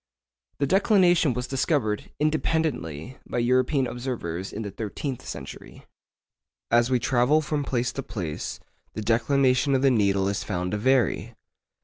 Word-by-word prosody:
The 140 - +1
declination 180 - +3
was 125 0 -2
discovered, 130 -5 -1
independently, 150 - -1
by - - -3
European 130 +3 +2
observers 115 -9 -4
in 110 - -5
the 100 - -5
thirteenth 115 +6 -5
century. - - -9 0.9
As 120 +1 +4
we 130 - +3
travel 125 +4 +3
from 150 -1 -2
place 125 -2 -1
to 135 - -3
place, 95 - -5 0.4
the 110 - -4
declination 130 +4 +2
of 130 - +1
the 135 - +5
needle 100 -4 +2
is 100 0 -1
found 90 -2 -3
to 105 - -1
vary. 130 +2 +1
125 Hz, 140 wpm, -25 LUFS, 105-140 Hz, 0.9 s, the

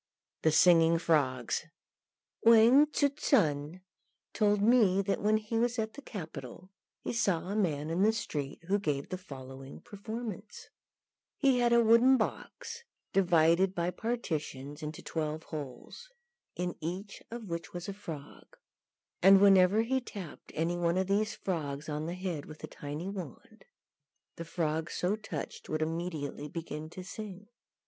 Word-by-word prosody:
THE 160 - +3
SINGING 165 0 +6
FROGS. 140 -6 +1 0.8
Wang 235 +6 +7
Tzŭ 285 -1 0
sun 155 - +1 0.5
told 210 -1 +2
me 210 -3 +4
that 195 0 -1
when 215 +1 +3
he 215 +1 -2
was 240 +1 +1
at 220 -1 -2
the 285 - -9
capital 165 - -8 0.3
he - - -3
saw 185 -7 0
a 200 - -2
man 160 -7 0
in 170 +3 0
the 215 +2 +5
street 150 -10 -4
who 195 +4 +1
gave 145 -8 -2
the 185 - -3
following 135 -4 -10
performance: 215 0 -7 0.7
He 270 -3 +3
had 240 -1 +3
a 235 0 +6
wooden 235 +4 +6
box, 465 - -4 0.3
divided 180 0 +4
by 175 +1 0
partitions 155 - -4
into 150 0 -6
twelve 155 0 -3
holes, 150 - -8 0.5
in 180 0 -2
each 185 +5 -5
of 235 0 -6
which 170 -1 -5
was 175 -1 -6
a 200 - -4
frog; 160 -8 -10 0.6
and 195 +1 +8
whenever 195 +2 +6
he 260 +3 0
tapped 195 -10 -9
any 165 +2 0
one 170 0 +1
of 190 - +1
these 205 +3 0
frogs 150 -6 -3
on 150 +1 -3
the 170 - -3
head 180 -6 -4
with 155 0 -12
a - - -4
tiny 150 +5 -6
wand, 185 -9 -8 0.7
the 165 - -6
frog 160 -1 -2
so 180 +4 0
touched 195 -9 -7
would 155 0 0
immediately 160 -3 -4
begin 155 -1 -6
to 185 +2 -8
sing. 205 0 -8
180 Hz, 150 wpm, -31 LUFS, 155-215 Hz, 0.8 s, and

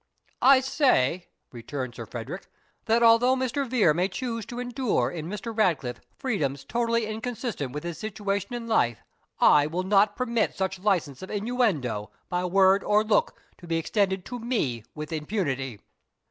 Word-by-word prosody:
"I 260 +1 +7
say," 250 - +2 0.2
returned 125 +1 -5
Sir - - -8
Frederick, - - -7 0.4
"that 230 +1 +3
although 230 +3 +6
Mr. 260 +2 -1
Vere 220 -11 +4
may 180 +4 +1
choose 230 +1 -4
to 240 - -7
endure 250 -1 0
in 165 -1 -5
Mr. 210 +3 -5
Ratcliffe 165 - 0 0.2
freedoms 150 - -2
totally 230 -1 0
inconsistent 220 - -4
with 150 +2 -5
his 170 -2 -5
situation 205 +1 -3
in 235 -1 -5
life, 120 - +1 0.4
I 145 0 +6
will 175 +4 -2
not 205 +2 +3
permit 235 -3 0
such 190 -1 -2
license 180 -9 0
of 190 - -8
innuendo, 200 - -1 0.2
by 180 0 -1
word 190 +1 +4
or 210 +1 +3
look, 215 -1 +1 0.2
to 175 - -12
be 165 0 0
extended 190 +2 0
to 245 - -6
me, 210 - -1
with 150 +1 -6
impunity." 145 - -2
200 Hz, 160 wpm, -26 LUFS, 155-230 Hz, 0.4 s, I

